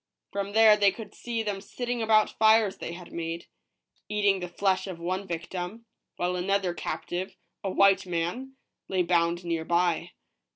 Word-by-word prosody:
From 200 0 -3
there 220 -1 +7
they 200 -1 +4
could 220 +1 -10
see 230 -2 -3
them 205 -2 -3
sitting 245 +4 -4
about 220 -1 +4
fires 220 -2 +5
they 165 - -6
had 175 0 -10
made, 165 0 -4 0.6
eating 205 -2 +2
the 180 - -4
flesh 190 +2 0
of 185 -3 -6
one 185 +3 -3
victim, 180 +6 -5 0.3
while 180 +1 -1
another 190 0 0
captive, 180 +1 -4 0.3
a 195 - -1
white 195 0 +4
man, 180 +11 -3 0.3
lay 185 -2 +1
bound 170 0 +1
near 165 -1 -1
by. 175 0 +1
190 Hz, 160 wpm, -27 LUFS, 175-210 Hz, 0.6 s, there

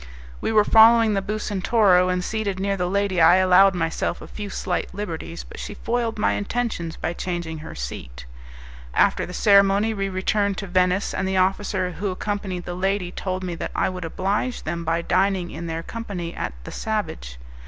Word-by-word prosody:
We - - -1
were 210 -1 +4
following 225 0 +6
the 195 - +1
Bucentoro, 195 -2 +2
and 180 0 0
seated 205 -2 -2
near 200 +1 0
the 180 -2 -1
lady 200 -2 +1
I 165 +2 +7
allowed 185 +1 +5
myself 165 0 -1
a - - -10
few 205 -1 -7
slight 185 -1 -3
liberties, 170 -4 -5
but - - -11
she 205 - -6
foiled 230 0 -2
my 210 - +2
intentions 205 -6 -2
by 170 - -2
changing 170 -3 -4
her 155 - -9
seat. - - -7 0.7
After - - +3
the - - -8
ceremony 200 +2 +4
we 195 -2 -2
returned 195 +1 0
to 200 - -4
Venice, 185 +1 +1
and 190 - -1
the 190 0 0
officer 185 0 +1
who 195 +3 -3
accompanied 190 -1 -4
the 175 - -4
lady 190 0 -1
told 185 0 -4
me 180 -1 -3
that 165 - -4
I - - +1
would 185 -1 -6
oblige 200 +9 -2
them 170 +1 -3
by 165 +1 0
dining 185 -1 +1
in 170 +1 -6
their 165 0 -4
company 185 -6 -5
at - - -4
"The - - -8
Savage." 160 - -4
190 Hz, 185 wpm, -23 LUFS, 175-205 Hz, 0.7 s, I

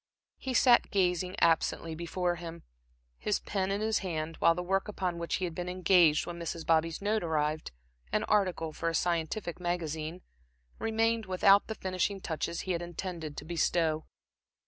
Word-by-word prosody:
He 260 -2 -3
sat 240 0 +5
gazing 180 -1 +1
absently 165 0 +2
before 175 +2 -2
him, 165 -1 -8 0.6
his 210 - +1
pen 195 -2 -2
in 200 +1 -1
his 220 0 +1
hand, 165 -4 -3
while 165 - +4
the 180 - -3
work 195 +3 0
upon 185 -4 -2
which 170 - -1
he 185 - -1
had 170 - -4
been 180 +1 -4
engaged 180 -4 +4
when 175 0 -6
Mrs. 165 -1 -4
Bobby's 165 +2 +1
note 215 +1 +1
arrived 155 - -1 0.4
an - - +1
article 185 -6 +1
for 165 - -1
a 165 - -2
scientific 175 +2 -1
magazine 170 -1 -3 0.6
remained 225 -1 +1
without 195 +2 +5
the 220 - -4
finishing 190 +1 -1
touches 170 -1 -3
he 185 - -3
had 170 -1 -1
intended 170 -3 -5
to 150 - -6
bestow. 160 -1 0
175 Hz, 170 wpm, -30 LUFS, 165-195 Hz, 0.6 s, sat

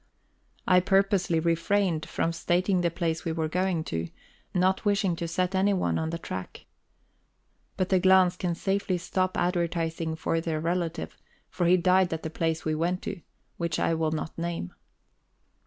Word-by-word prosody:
I 180 -1 +6
purposely 195 -2 +2
refrained 170 0 +1
from 165 - -1
stating 180 +2 +1
the 170 - +2
place 165 -1 -2
we 165 - -2
were 160 -1 -1
going 180 0 0
to, 80 - -3 0.4
not 185 +1 +1
wishing 200 -4 +1
to 170 - -3
set 180 +3 -1
anyone 190 0 +1
on 160 0 -2
the 165 - -3
track. 95 - -7 1.1
But 185 - 0
the 190 - +4
Glahns 185 -1 +5
can 175 -2 -2
safely 195 0 0
stop 185 +2 -1
advertising 170 -2 -1
for 165 +1 -1
their 160 -2 -2
relative; 170 +1 -2 0.4
for 175 - 0
he 180 +1 +6
died 185 +1 +3
at 160 - -4
the 160 - -4
place 160 0 -1
we 155 - +1
went 175 +4 -1
to, 200 -4 -5 0.4
which 170 -2 -1
I - - +1
will 160 -1 0
not 155 0 -4
name. 170 - -3
175 Hz, 165 wpm, -27 LUFS, 165-185 Hz, 1.1 s, I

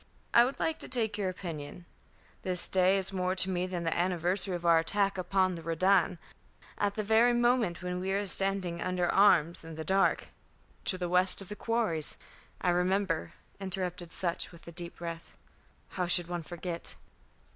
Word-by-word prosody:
"I 235 - +7
would 265 - -5
like 320 -1 -1
to - - -6
take 225 -4 +1
your 200 -3 -1
opinion. 170 -2 -7 0.6
This 180 -1 +4
day 190 +1 +3
is 195 0 -4
more 185 0 -1
to 190 0 +5
me 180 0 -1
than 180 -2 -4
the 165 - -1
anniversary 180 +2 0
of 175 0 -6
our 165 -1 +5
attack 195 +4 0
upon 185 0 0
the 170 - -7
Redan. 180 +3 +2 0.6
At 205 0 0
the 215 - -2
very 225 +3 +4
moment 240 -7 +1
when 180 0 -3
we 190 +1 -3
were 200 +1 0
standing 195 -3 -2
under 180 -1 -1
arms 175 -5 +3
in 165 0 -9
the 160 - -5
dark 195 +3 +1 0.3
" - - -34
"To 185 - +1
the 180 -1 -3
west 180 +1 +4
of 195 - +1
the 210 - -5
quarries; 220 -10 -2 0.4
I 180 - +2
remember," 180 -1 0 0.3
interrupted 180 -2 -4
Sutch, 175 -2 0
with 170 -1 -16
a - - -8
deep 170 +1 -6
breath. 170 -1 -8 0.6
"How 180 -2 -3
should 175 -1 +4
one 175 -1 -4
forget?" 170 +1 -4
185 Hz, 185 wpm, -30 LUFS, 175-195 Hz, 0.6 s, I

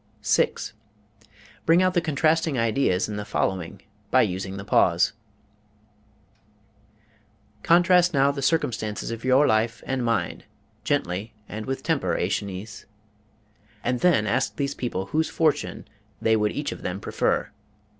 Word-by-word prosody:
Bring 170 +3 +5
out 185 -1 +2
the 175 - +2
contrasting 160 -1 +1
ideas 115 -4 +1
in 105 - -5
the 105 - -3
following 95 -4 -2 0.3
by - - +5
using 95 +1 -3
the 100 - -7
pause: 90 -4 +3 2.5
Contrast 175 - +4
now 140 -1 +3
the 140 -1 -5
circumstances 115 -8 -1
of 115 -1 -6
your 130 +3 +4
life 110 -1 +1
and 130 -2 -2
mine, 115 -1 -1 0.4
gently 100 +6 -2
and 110 0 -6
with 135 0 -3
temper, 160 -4 0
Æschines; 100 +2 -4 1.0
and 125 0 0
then 170 -11 +3
ask 105 0 0
these 140 +3 -2
people 95 -7 -3
whose 155 +10 0
fortune 155 -2 0 0.3
they 110 0 +3
would 105 -1 +1
each - - -3
of - - -8
them - - -4
prefer. - - -1
115 Hz, 130 wpm, -25 LUFS, 105-150 Hz, 2.5 s, Bring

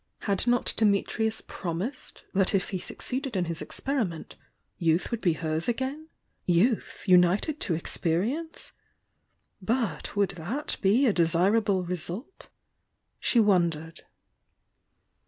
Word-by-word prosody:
Had 200 +2 0
not 245 0 +2
Dimitrius 220 +1 +2
promised 185 - -5
that 195 0 +3
if 195 - 0
he 190 - -3
succeeded 260 - -5
in 180 - +1
his 165 -1 -3
experiment, 230 - -3 0.4
youth 165 +4 +1
would 235 -1 -2
be 175 -4 +3
hers 160 0 -2
again?— 265 +6 -2 0.4
youth, 195 +7 +1
united 185 - +4
to 170 - 0
experience? 210 - -1 0.4
— - - -46
but 210 - -3
would 200 -2 +2
that 210 - -2
be 220 +8 +4
a 225 - +3
desir 175 +4 +3
able 200 -4 +1
result? 180 - -5 0.7
She 240 - +3
wondered. 170 -6 +1
195 Hz, 120 wpm, -27 LUFS, 170-240 Hz, 0.7 s, united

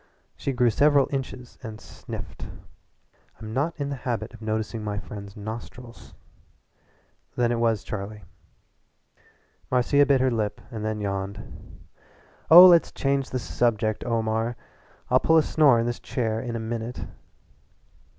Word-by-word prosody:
She 140 - -3
grew 125 -2 +2
several 145 +3 +4
inches 130 -2 -5
and 110 -3 -8
sniffed. - - -9 0.9
"I'm 110 0 -7
not 150 +6 -1
in 140 0 -2
the 140 - -3
habit 120 -3 -4
of 115 - -13
noticing 110 0 -3
my 105 -1 -3
friends' 100 +1 -8
nostrils. 115 +3 -9 1.2
"Then 120 -1 +1
it 120 - 0
was 115 -2 +1
Charlie?" 105 0 -6 1.5
Marcia 130 +3 +3
bit 140 -2 +4
her 130 0 +2
lip 105 -3 -2
and 110 -2 -5
then 110 -1 -2
yawned. 100 0 -6 0.7
"Oh, 175 +4 +11
let's 175 -2 +6
change 135 -1 -1
the 130 - -2
subject, 115 -3 0
Omar. 115 0 -1 0.6
I'll - - +6
pull 160 - +4
a 160 - +5
snore 145 -7 +4
in 115 - 0
this 120 0 -3
chair 110 -3 -2
in 120 -2 -5
a - - -2
minute." 115 +1 -5
115 Hz, 140 wpm, -25 LUFS, 110-130 Hz, 1.5 s, Oh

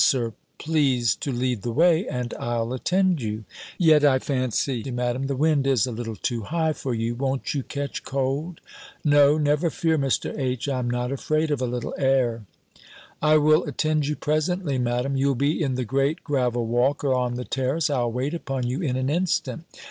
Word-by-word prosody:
Sir, 120 -4 +2 0.2
please 135 -8 +2
to 140 - -3
lead 125 -3 -1
the 120 - -3
way, 170 - +3
and 125 -1 -3
I'll 120 0 -2
attend 180 +4 +1
you." 110 -1 -4 0.3
"Yet 155 -4 +5
I 140 -3 +5
fancy, 130 -2 -1
Madam, 125 +1 -1
the 140 - -1
wind 145 -1 +2
is 130 -4 +3
a 125 - -4
little 115 -1 -5
too 115 +2 -2
high 160 +7 0
for 130 -4 -3
you. 115 +1 -1
Won't 135 +2 -2
you 140 - -1
catch 140 +1 -5
cold?" 140 +5 -2 0.4
"No, 145 0 +5
never 150 +2 +2
fear, 160 0 0
Mr. 135 -2 -1
H., 130 -2 -2
I 135 -2 -1
am 120 -1 -2
not 125 +1 -1
afraid 155 +3 0
of 145 -3 0
a 125 - 0
little 120 -1 -4
air." 125 -6 +1 0.7
"I 155 0 +5
will 155 +2 +4
attend 155 0 0
you 150 - -1
presently, 155 -1 -1
Madam: 125 +3 0
you'll 135 0 +2
be 145 +7 0
in 135 -4 0
the 125 -1 -2
great 135 +6 0
gravel 125 -5 0
walk, 120 +6 +1
or 135 -2 +2
on 125 -1 0
the 125 0 -4
terrace. 135 +4 0
I'll 120 -4 0
wait 130 +6 -2
upon 135 -6 -3
you 125 +7 -2
in 135 -7 -1
an 130 0 -1
instant." 170 +1 -1
135 Hz, 195 wpm, -24 LUFS, 125-150 Hz, 0.7 s, Yet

